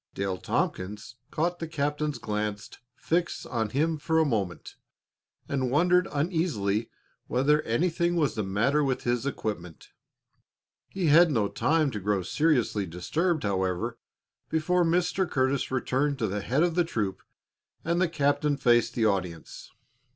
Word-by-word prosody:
Dale 95 Hz, -2 st, -2 dB
Tompkins 105 Hz, +6 st, -3 dB
caught 175 Hz, +3 st, -1 dB
the 165 Hz, -, -4 dB
captain's 150 Hz, -1 st, -2 dB
glance 105 Hz, -1 st, -3 dB, 0.2 s
fixed 170 Hz, +5 st, -1 dB
on 115 Hz, -4 st, -2 dB
him 155 Hz, +6 st, 0 dB
for 160 Hz, +2 st, 0 dB
a 160 Hz, -, +4 dB
moment, 100 Hz, -, -2 dB, 0.7 s
and 130 Hz, -3 st, -1 dB
wondered 180 Hz, +6 st, +3 dB
uneasily 140 Hz, -, 0 dB, 0.4 s
whether 145 Hz, +5 st, +2 dB
anything 170 Hz, +7 st, 0 dB
was 155 Hz, -5 st, +1 dB
the 110 Hz, -, -2 dB
matter 115 Hz, +10 st, +1 dB
with 135 Hz, -2 st, -1 dB
his 120 Hz, +2 st, 0 dB
equipment. 90 Hz, -, -5 dB, 1.0 s
He 190 Hz, -2 st, -3 dB
had 165 Hz, +3 st, +6 dB
no 110 Hz, -8 st, +1 dB
time 155 Hz, +5 st, +1 dB
to 105 Hz, -, -4 dB
grow 100 Hz, -1 st, 0 dB
seriously 120 Hz, -, +1 dB
disturbed, 155 Hz, -, -1 dB
however, 100 Hz, +3 st, -1 dB, 0.5 s
before 175 Hz, +3 st, +2 dB
Mr. 175 Hz, +2 st, +1 dB
Curtis 130 Hz, 0 st, 0 dB
returned 135 Hz, +2 st, 0 dB
to 115 Hz, -, -1 dB
the 100 Hz, +1 st, -3 dB
head 135 Hz, -, +1 dB
of 175 Hz, -1 st, +1 dB
the 175 Hz, +1 st, +3 dB
troop 105 Hz, -, -3 dB, 0.6 s
and 170 Hz, +2 st, +1 dB
the 185 Hz, -, +2 dB
captain 145 Hz, -1 st, +1 dB
faced 120 Hz, -3 st, +3 dB
the 115 Hz, -, +2 dB
audience. 90 Hz, -6 st, -3 dB
135 Hz, 145 wpm, -27 LUFS, 105-160 Hz, 1.0 s, had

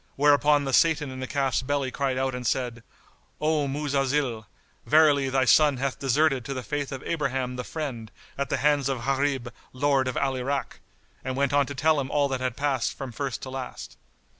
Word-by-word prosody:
whereupon 145 Hz, 0 st, +4 dB
the 135 Hz, -, -2 dB
Satan 155 Hz, -3 st, +3 dB
in 130 Hz, -, -7 dB
the 130 Hz, -, -4 dB
calf's 135 Hz, -1 st, 0 dB
belly 135 Hz, -1 st, -1 dB
cried 135 Hz, -2 st, -1 dB
out 130 Hz, 0 st, 0 dB
and 125 Hz, -1 st, -4 dB
said, 120 Hz, -3 st, -1 dB, 0.6 s
"O 150 Hz, -1 st, +1 dB
Muzalzil, 135 Hz, -5 st, -1 dB, 0.4 s
verily 145 Hz, -3 st, +4 dB
thy 130 Hz, 0 st, +2 dB
son 145 Hz, +1 st, +5 dB
hath 135 Hz, +1 st, -2 dB
deserted 135 Hz, 0 st, +2 dB
to 135 Hz, +3 st, -5 dB
the 130 Hz, -, -4 dB
Faith 140 Hz, +6 st, -3 dB
of 135 Hz, -1 st, -6 dB
Abraham 135 Hz, -5 st, -2 dB
the 125 Hz, -, -4 dB
Friend, 125 Hz, -8 st, -5 dB, 0.3 s
at 140 Hz, 0 st, -3 dB
the -, -, 0 dB
hands 145 Hz, -2 st, +2 dB
of 125 Hz, -3 st, -3 dB
Gharib 135 Hz, -3 st, 0 dB, 0.2 s
Lord 135 Hz, 0 st, +1 dB
of 130 Hz, -, -2 dB
Al 135 Hz, -1 st, 0 dB
Irak;" 135 Hz, +2 st, -3 dB, 0.4 s
and 130 Hz, 0 st, -3 dB
went 140 Hz, 0 st, 0 dB
on 145 Hz, -2 st, +3 dB
to 140 Hz, -, -6 dB
tell 155 Hz, +2 st, +2 dB
him 135 Hz, -1 st, -3 dB
all 145 Hz, -1 st, +2 dB
that 130 Hz, -1 st, -2 dB
had 125 Hz, -2 st, -2 dB
passed 140 Hz, -2 st, -1 dB
from 135 Hz, -2 st, -6 dB
first 135 Hz, +2 st, -4 dB
to 130 Hz, -, -6 dB
last. 130 Hz, -1 st, -7 dB
135 Hz, 200 wpm, -26 LUFS, 130-145 Hz, 0.6 s, son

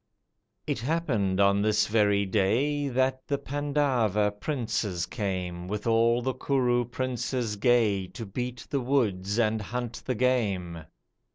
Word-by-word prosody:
It -, -, -2 dB
happened 115 Hz, -, 0 dB
on 100 Hz, 0 st, +4 dB
this 105 Hz, 0 st, +2 dB
very 105 Hz, -2 st, +2 dB
day 120 Hz, +10 st, +1 dB
That 130 Hz, 0 st, 0 dB
the 140 Hz, -, 0 dB
Pandava 135 Hz, -8 st, 0 dB
princes 105 Hz, -, -2 dB
came 90 Hz, -5 st, -4 dB
With 105 Hz, +1 st, -4 dB
all 115 Hz, +1 st, +3 dB
the 130 Hz, +1 st, 0 dB
Kuru 125 Hz, -3 st, +1 dB
princes 125 Hz, -2 st, -2 dB
gay 105 Hz, -4 st, +2 dB
To 115 Hz, +4 st, -8 dB
beat 125 Hz, +4 st, -5 dB
the 140 Hz, -, 0 dB
woods 105 Hz, -7 st, 0 dB
and 110 Hz, -2 st, +1 dB
hunt 120 Hz, +2 st, -5 dB
the 130 Hz, -, -2 dB
game. 100 Hz, -10 st, 0 dB
115 Hz, 130 wpm, -27 LUFS, 100-130 Hz, -, on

